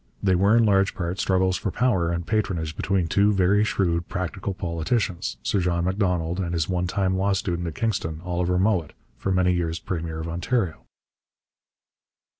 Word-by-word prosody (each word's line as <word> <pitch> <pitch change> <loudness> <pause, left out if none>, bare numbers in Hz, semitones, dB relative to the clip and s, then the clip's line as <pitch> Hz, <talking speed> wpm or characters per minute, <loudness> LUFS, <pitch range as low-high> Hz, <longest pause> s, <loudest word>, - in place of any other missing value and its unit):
They 95 -2 +3
were 100 +5 +4
in 115 - +5
large 95 -2 +3
part 90 +1 -3
struggles 95 -1 +2
for - - -3
power 95 -6 +1
and 85 0 -2
patronage 85 -8 -1
between 95 -3 0
two 100 +5 +3
very 100 +1 +3
shrewd 85 -5 0
practical 95 +2 -3
politicians, 85 - -2
Sir 100 - +1
John 85 -1 0
Macdonald 90 -3 0
and 85 -2 -2
his 80 -2 0
one 90 -1 -1
time 95 +1 0
law 100 +1 +1
student 90 -3 -2
at 80 - -5
Kingston, 90 -8 -2
Oliver 90 0 0
Mowat, 95 -5 +1 0.3
for 95 - -1
many 90 -1 +3
years 85 -2 -1
premier 80 -3 -4
of 80 - -4
Ontario. 85 +1 -1
90 Hz, 170 wpm, -24 LUFS, 85-100 Hz, 0.3 s, in